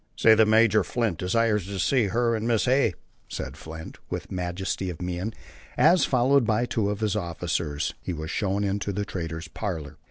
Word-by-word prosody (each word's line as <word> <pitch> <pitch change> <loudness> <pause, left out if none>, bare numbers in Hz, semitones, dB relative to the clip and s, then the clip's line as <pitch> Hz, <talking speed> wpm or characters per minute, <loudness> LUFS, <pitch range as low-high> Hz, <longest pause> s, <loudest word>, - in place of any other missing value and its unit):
"Say 110 - +6
that 110 0 +5
Major 110 -1 +5
Flint 115 -9 -1
desires 105 +1 +1
to 100 -1 -5
see 120 +6 +2
her 115 +4 +1
and 110 +1 -2
Mrs. 115 -3 +2
Hay," 130 +2 +3 0.4
said - - -5
Flint, 80 0 -9
with - - -5
majesty 90 +1 -3
of 85 - -6
mien, 90 +4 -3 0.5
as, 175 -3 +5
followed 130 +1 +3
by 115 +2 +2
two 110 -4 0
of 105 +1 -3
his 110 -2 0
officers, 85 -5 -2
he - - -4
was 80 -1 -5
shown 100 0 0
into 100 0 -1
the 100 +1 -2
trader's 85 -3 -5
parlor. 85 -6 -5
100 Hz, 185 wpm, -26 LUFS, 90-115 Hz, 0.5 s, Say